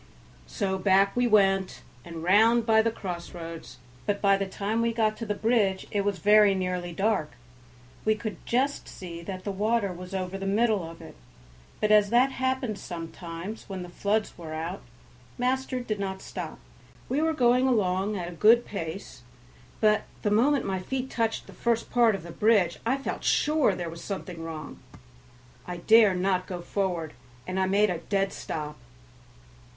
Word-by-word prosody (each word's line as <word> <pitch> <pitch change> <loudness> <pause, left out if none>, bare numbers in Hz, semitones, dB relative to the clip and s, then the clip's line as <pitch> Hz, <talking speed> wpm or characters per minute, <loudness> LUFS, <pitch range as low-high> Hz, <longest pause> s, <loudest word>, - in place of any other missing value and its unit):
So 190 -3 -2
back 195 +1 +3
we 245 0 +2
went 195 -3 +2 0.2
and 165 -1 -8
round 220 +6 +5
by 220 -1 +5
the 230 - +1
crossroads, 170 - -7 0.3
but 205 -1 0
by 200 -1 +4
the 195 0 -2
time 210 +4 -2
we 230 0 +1
got 220 -2 +1
to 230 - -5
the 210 - -1
bridge 205 -4 +1
it 205 - +1
was 200 -1 0
very 210 -1 +5
nearly 180 -1 -2
dark; 180 - 0 0.7
we 215 0 +3
could 215 -3 -6
just 270 +4 0
see 170 -2 -8
that 185 +2 -6
the 200 - -2
water 205 0 0
was 180 +2 -8
over 190 0 -3
the 195 - -3
middle 215 -1 +2
of 165 - -12
it; - - -11 0.7
but 215 - +1
as 210 -1 +6
that 250 +4 +4
happened 260 -5 -1
sometimes 170 +4 -7
when 190 -2 -5
the 180 - -9
floods 205 +4 -1
were 160 -2 -6
out, 160 - -4 0.6
master 255 +1 0
did 215 -4 -3
not 190 -1 -3
stop. - - -6 0.5
We 275 +4 0
were 320 0 +2
going 250 -2 +3
along 200 -3 +1
at 175 -2 -4
a - - -6
good 225 +7 +5
pace, 165 -7 -6 0.6
but 215 -1 +3 0.2
the 210 - +1
moment 260 +6 +3
my 190 -1 -1
feet 260 +7 -4
touched 225 -1 -1
the - - -13
first 235 -1 -1
part 235 -3 +4
of 195 - -7
the 170 - -9
bridge 200 -3 +2
I 260 +3 +2
felt 275 - -5
sure 300 -9 +2
there 175 -1 -4
was 165 0 -8
something 180 -4 -6
wrong. 155 -2 -7 0.9
I 180 - -4
dare 215 +2 +5
not 185 0 0
go 180 -2 -5
forward, 175 -4 -2 0.3
and 185 +1 -3
I 190 - +2
made 200 +1 +3
a 170 - -3
dead 195 +2 -1
stop. 150 -2 -5
200 Hz, 175 wpm, -27 LUFS, 180-225 Hz, 0.9 s, as